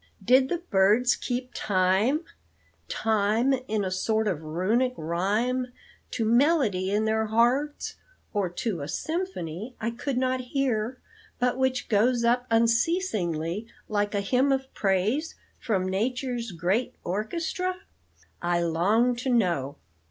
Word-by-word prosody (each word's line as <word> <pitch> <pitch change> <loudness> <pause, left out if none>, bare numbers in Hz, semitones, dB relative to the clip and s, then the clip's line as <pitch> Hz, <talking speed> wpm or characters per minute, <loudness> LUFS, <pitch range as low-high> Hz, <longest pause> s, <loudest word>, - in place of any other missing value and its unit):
"Did 260 +3 +5
the 350 - 0
birds 210 +6 +4
keep 250 0 -4
'time 195 - +2 0.7
time, 220 +4 +2
in 210 -2 0
a 185 - -2
sort 220 +4 0
of 175 -6 -1
runic 205 +11 0
rhyme' 210 +10 -1 0.4
to 225 - -2
melody 235 - +3
in 210 +2 +1
their 220 0 +1
hearts, 245 +7 +1 0.4
or 200 -4 0
to 175 -1 -3
a 140 - -4
symphony, 250 - -4
I 230 +1 -1
could 245 +3 -3
not 255 0 +1
hear, 250 -2 -1 0.4
but 250 0 +1
which 260 0 0
goes 235 +3 +2
up 245 +1 +2
unceasingly 225 - +1 0.2
like 205 -1 -1
a 200 - +1
hymn 255 +7 +2
of 265 0 -1
praise 210 - 0 0.2
from 190 -5 0
nature's 240 +3 -2
great 180 +8 -1
orchestra? 335 - -2 0.6
I 175 0 +1
longed 210 +9 +2
to 260 - -2
know. 170 - +1
225 Hz, 130 wpm, -27 LUFS, 190-255 Hz, 0.7 s, Did